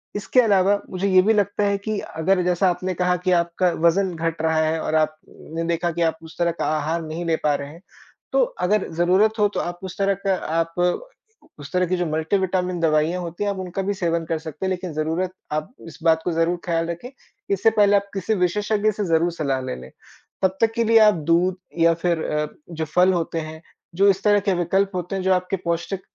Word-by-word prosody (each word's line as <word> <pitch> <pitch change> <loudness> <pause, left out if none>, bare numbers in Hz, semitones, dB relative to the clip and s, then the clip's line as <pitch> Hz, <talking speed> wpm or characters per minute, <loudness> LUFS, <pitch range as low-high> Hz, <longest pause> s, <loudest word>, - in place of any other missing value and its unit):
इसके 205 +5 +1
अलावा 200 -2 +3
मुझे 185 +2 -2
ये 185 -1 +6
भी 220 - +4
लगता 205 0 +1
है 200 0 +2
कि 205 +1 -3 0.2
अगर 180 +4 +2
जैसा 180 +1 +2
आपने 185 +1 -2
कहा 180 +1 +1
कि 185 - +3
आपका 170 +1 +2 0.2
वजन 185 +2 +3
घट 165 0 -2
रहा 160 0 +1
है 160 +1 0
और 155 - -1
आपने 155 +1 -3
देखा 170 0 0
कि 170 +1 -4
आप 160 - -2
उस 160 - -13
तरह 170 0 +2
का - - 0
आहार 160 +3 -1
नहीं 160 +2 -5
ले 165 -1 +2
पा 150 - +3
रहे 140 0 -5
हैं। 165 +4 -13 0.5
तो - - +3 0.3
अगर 210 0 +1
ज़रूरत 190 +6 +2
हो 210 - +5
तो - - 0
आप 175 0 -4
उस 185 -2 -7
तरह 200 0 +2
का 190 - +3 0.2
आप 165 0 -1 0.9
उस 140 -1 -10
तरह 180 0 +2
की 185 - 0
जो 175 - 0
मल्टीविटामिन 180 +2 0
दवाइयाँ 160 +2 +1
होती 170 +3 -5
हैं, 205 - 0
आप 200 - -5
उनका 185 +1 -4
भी 200 +2 -1
सेवन 170 -3 -1
कर 160 0 -1
सकते 160 +3 -6
हैं। - - 0
लेकिन 180 -2 -4
ज़रूरत 160 +4 -1 0.2
आप 155 +10 -3
इस 160 0 -12
बात 160 -1 +4
को 175 - -1
ज़रूर 165 +2 +1
ख़्याल 165 -1 0
रखें 170 +9 -6 0.4
इससे 200 +3 +3
पहले 205 -1 +4
आप 200 - +3
किसी 195 +2 -1
विशेषज्ञ 210 +3 +1
से 205 -1 -3
ज़रूर 165 +1 +2
सलाह 140 -5 -1
ले 130 - -4
लें। 65 - -11 0.5
तब 190 0 +2
तक 225 -1 +4
के 235 - +2
लिए 225 0 +5
आप 215 -1 +6 0.2
दूध 180 +2 +2 0.2
या 165 0 +5
फिर 170 -1 -1
अ, 150 0 -1 0.2
जो 160 -1 -3
फल 180 +4 +3
होते 165 -1 -2
हैं, 160 0 -7 0.3
जो 195 +3 +4
इस 195 0 +1
तरह 205 -1 +4
के 200 -1 0
विकल्प 190 +3 +1
होते 180 +1 -3
हैं 190 - -3
जो 190 0 +3
आपके 180 +1 0
पौष्टिक 170 +3 -2
180 Hz, 225 wpm, -22 LUFS, 165-195 Hz, 0.9 s, ये